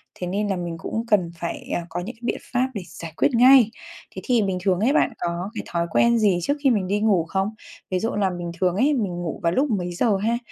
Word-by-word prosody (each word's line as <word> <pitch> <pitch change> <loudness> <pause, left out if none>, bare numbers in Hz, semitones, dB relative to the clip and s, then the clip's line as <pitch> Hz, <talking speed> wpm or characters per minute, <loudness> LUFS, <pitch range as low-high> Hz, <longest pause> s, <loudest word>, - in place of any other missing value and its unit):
thế 180 - -5
nên 205 +3 -1
là 195 - 0
mình 170 -2 -4
cũng 225 +7 -4
cần 185 -7 +2
phải, 170 - -5
à, - - 0
có 175 +2 -4
những 225 +7 -6
cái 230 - -28
biện 240 - -1 0.2
pháp 250 +1 +2
để 205 - -4
giải 165 -2 -9
quyết - - +3
ngay. 250 -1 +7 0.5
Thế - - -5
thì 245 -4 +3
bình 190 -2 -1
thường 185 -1 +1
ấy, 245 +8 +2
bạn - - +2
có 175 +3 -3
cái - - -5
thói 170 0 -1
quen 235 +5 +4
gì 200 -5 +3
trước 285 - +1
khi 275 - +5
mình 205 -7 +1
đi 205 +2 0
ngủ 200 -6 +2
không? 190 +4 -1 0.4
Ví 185 - +1
dụ 225 - -1
là 200 -2 +1
bình 175 -1 -5
thường 180 -1 +2
ấy, 275 +9 +3
mình 215 -8 -1
ngủ 165 - -4
vào 170 - +2
lúc 265 - +1
mấy 180 -4 -1
giờ 205 +2 +2
ha? 225 +4 0
195 Hz, 270 wpm, -23 LUFS, 175-230 Hz, 0.5 s, ngay